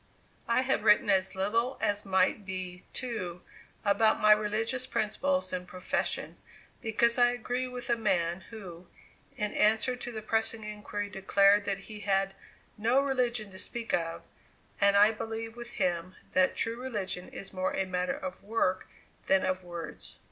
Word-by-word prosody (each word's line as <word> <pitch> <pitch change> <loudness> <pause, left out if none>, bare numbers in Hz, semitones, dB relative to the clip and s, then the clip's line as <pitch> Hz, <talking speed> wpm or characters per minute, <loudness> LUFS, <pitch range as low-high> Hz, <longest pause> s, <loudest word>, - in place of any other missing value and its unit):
I 235 +2 +3
have 260 -5 +1
written 210 -1 +5
as 190 0 +2
little 230 +7 0
as 205 -1 0
might 190 +2 +2
be, 185 -1 -6
too, 185 -9 -4 0.4
about 215 +2 +4
my 215 - +6
religious 215 +4 +2
principles 275 +6 0
and 180 0 -3
profession, 185 0 -2 0.4
because 235 +1 +2
I 245 - +7
agree 245 +1 -2
with 250 -1 -6
the 235 - +2
man 185 -5 0
who, 185 -6 -9 0.5
in 210 0 -1
answer 220 +4 +3
to 245 0 -6
the 220 -2 -6
pressing 225 0 0
inquiry, 210 -1 -4
declared 200 +1 +4
that 195 -1 -2
he 210 +1 -9
had 195 -1 +1 0.5
"no 235 +5 +4
religion 245 -6 0
to 190 - -10
speak 235 -1 -4
of"; 165 -1 -1 0.6
and 200 0 +5
I 205 +2 +7
believe 225 +1 -5
with 240 0 -9
him 180 -1 -1 0.2
that 185 0 +3
true 230 +2 -2
religion 205 -8 -3
is 195 - -7
more 185 0 -1
a 195 - +1
matter 180 -1 -1
of 185 -1 -6
work 200 -3 0 0.4
than 190 0 +4
of 185 0 -1
words. 175 -1 -7
210 Hz, 160 wpm, -30 LUFS, 190-230 Hz, 0.6 s, I